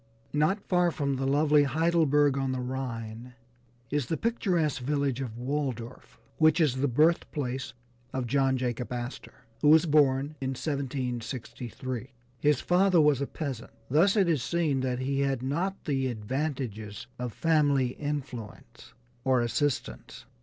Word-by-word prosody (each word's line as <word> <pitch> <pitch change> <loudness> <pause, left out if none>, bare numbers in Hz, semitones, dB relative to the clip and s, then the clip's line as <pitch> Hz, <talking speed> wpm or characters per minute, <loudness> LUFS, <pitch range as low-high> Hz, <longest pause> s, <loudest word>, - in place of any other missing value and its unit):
Not 155 +8 +2
far 180 -1 +3
from 140 -4 -1
the 135 +1 -1
lovely 150 +1 +4
Heidelberg 150 -1 +3
on 135 -1 -1
the 130 - -2
Rhine, 125 -2 -5 0.6
is 145 -4 0
the 160 - -1
picturesque 175 - 0
village 140 -1 0
of 115 -4 -5
Walldorf, 130 -2 -4 0.2
which 155 +1 +5
is 145 -6 +2
the 140 +2 +1
birth 155 +7 +3
place 130 -3 -3 0.4
of 130 -1 -2
John 135 +1 +2
Jacob 125 -1 -3
Astor, 125 +1 -7 0.2
who 150 - +3
was 160 +2 +7
born 145 -2 +3
in 130 0 -2
1763. 130 -2 -4 0.3
His 150 -2 +2
father 180 0 +4
was 150 -3 +4
a 140 - -1
peasant, 135 -7 -5 0.2
thus 175 - +4
it 195 -3 +4
is 155 -6 +2
seen 160 -3 0
that 130 -1 -1
he 135 +2 -1
had 135 -3 0
not 175 +9 -2
the 135 -3 0
advantages 115 -3 -4
of 125 -1 -3
family 145 -3 +2
influence 130 -6 -6 0.3
or 130 -2 +3
assistance. 135 +4 -2
135 Hz, 145 wpm, -28 LUFS, 125-150 Hz, 0.6 s, was